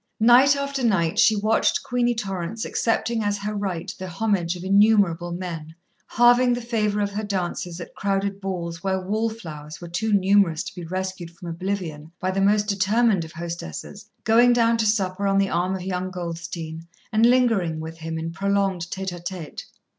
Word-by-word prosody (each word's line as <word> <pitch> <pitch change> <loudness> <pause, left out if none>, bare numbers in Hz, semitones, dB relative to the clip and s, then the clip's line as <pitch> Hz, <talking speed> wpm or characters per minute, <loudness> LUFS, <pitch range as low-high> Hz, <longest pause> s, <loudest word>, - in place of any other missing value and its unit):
Night 245 +5 +6
after 280 -1 -3
night 170 -8 +2
she 220 - +6
watched 215 +2 +1
Queenie 245 -1 +1
Torrance 195 0 -4
accepting 230 0 0
as 205 0 0
her 205 +1 -4
right 195 -2 -3
the 185 - -5
homage 180 -2 0
of 175 - -8
innumerable 195 -4 +3
men, 165 -3 -6 0.3
halving 245 +1 +5
the 240 - -1
favour 215 -3 0
of 200 0 -1
her 210 +2 -3
dances 180 -3 -3
at 170 - -9
crowded 200 0 -1
balls 175 -2 -4
where 190 -1 0
"wall 215 +5 -1
flowers" 155 -8 -9
were 175 - -8
too 215 +6 -2
numerous 195 -4 +3
to - - -8
be 175 - -8
rescued 185 0 -4
from 170 +1 -10
oblivion 165 -3 -4
by 185 0 -1
the 195 +1 -1
most 205 +1 +3
determined 205 0 +2
of 160 - -9
hostesses, 170 - -7
going 240 +2 +5
down 230 -1 +3
to 225 -1 +1
supper 200 -2 0
on 195 0 +2
the 195 -1 +2
arm 180 +3 0
of 185 - -5
young 185 0 -2
Goldstein 170 -2 -6 0.2
and 220 +1 +2
lingering 230 -10 +3
with 160 +1 -7
him 160 0 -4
in 165 +1 -4
prolonged 195 -2 0
tête 190 0 -3
à 175 -1 -9
tête. 175 -4 -6
195 Hz, 185 wpm, -24 LUFS, 170-215 Hz, 0.3 s, Night